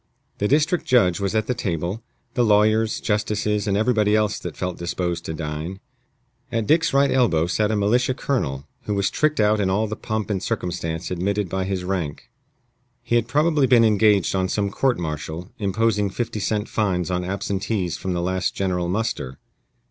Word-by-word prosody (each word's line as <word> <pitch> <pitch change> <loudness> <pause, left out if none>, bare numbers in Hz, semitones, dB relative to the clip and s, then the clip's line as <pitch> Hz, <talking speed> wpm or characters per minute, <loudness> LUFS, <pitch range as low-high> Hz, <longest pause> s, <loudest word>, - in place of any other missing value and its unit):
The 105 - +1
district 155 +7 +2
judge 100 -9 +4
was 100 +1 -1
at 110 -1 +2
the 125 - 0
table, 90 -1 -3 0.3
the 125 - +2
lawyers, 110 0 +3
justices, 105 -1 -1
and 100 -1 +1
everybody 110 -2 +2
else 105 -1 +1
that 85 -5 -7
felt 90 -1 -3
disposed 85 0 -2
to 80 - -3
dine. 80 +4 -5 0.7
At 115 -2 0
Dick's 160 +7 +3
right 140 0 +3
elbow 110 -12 +3
sat 105 +4 0
a 110 - +1
militia 120 +5 +2
colonel, 70 - -2 0.2
who 105 - -1
was 100 0 +1
tricked 155 -2 +1
out 105 0 +3
in 95 -2 +1
all 105 +4 +1
the 110 0 -4
pomp 110 -1 -3
and 95 -3 -1
circumstance 90 -7 -3
admitted 100 +2 -1
by 95 +1 -1
his 95 -1 -2
rank. 90 -6 -4 0.7
He 120 - 0
had 115 -1 +2
probably 150 +2 +2
been 120 -2 +6
engaged 105 -3 +3
on 95 -1 0
some 100 -1 0
court 130 +4 +1
martial, 80 +1 -5
imposing 105 0 +1
fifty 110 +1 -3
cent 105 +1 -1
fines 90 -5 -1
on 90 0 -1
absentees 95 -1 -2
from 95 -1 -3
the 85 -1 -1
last 95 +1 -1
general 90 -2 -1
muster. 90 - -2
100 Hz, 180 wpm, -23 LUFS, 90-110 Hz, 0.7 s, been